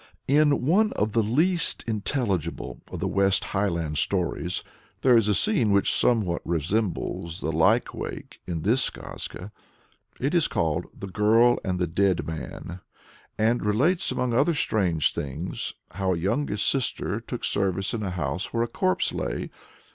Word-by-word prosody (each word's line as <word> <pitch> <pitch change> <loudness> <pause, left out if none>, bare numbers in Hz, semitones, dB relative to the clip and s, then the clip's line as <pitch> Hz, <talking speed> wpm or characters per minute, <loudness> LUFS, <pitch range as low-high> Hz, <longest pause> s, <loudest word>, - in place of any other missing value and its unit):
In 145 -1 +3
one 210 +8 +3
of 105 +1 0
the 115 - +2
least 160 - +2
intelligible 100 - -2
of 90 - -5
the 90 +3 -2
West 95 0 +2
Highland 85 -6 -1
tales, 90 -1 -1 0.4
there 125 -2 +5
is 115 -3 +4
a 105 - +3
scene 200 - +3
which 100 0 +3
somewhat 105 -8 +2
resembles 85 0 -2
the 80 - -1
"lykewake" 80 +1 0
in 85 -3 -3
this 120 +6 +3
skazka. 95 +4 -8 0.7
It 140 +5 -1
is 170 -3 +3
called 80 -2 -1
"The - - -8
Girl 110 +5 +4
and 90 -2 -1
the 90 - +1
Dead 95 +2 +1
Man," 80 +2 -6 0.6
and 115 +3 +2
relates, 140 - +2
among 125 -2 -1
other 145 +7 +3
strange 90 - +1
things, 75 +6 -4 0.2
how 95 -1 0
a - - -3
youngest 105 - 0
sister 135 -3 0
took - - -5
service 95 -1 0
in 115 - -2
a 100 - -2
house 90 +1 -3
where 115 0 +1
a - - -1
corpse 90 -5 0
lay. - - -3
100 Hz, 155 wpm, -26 LUFS, 85-120 Hz, 0.7 s, there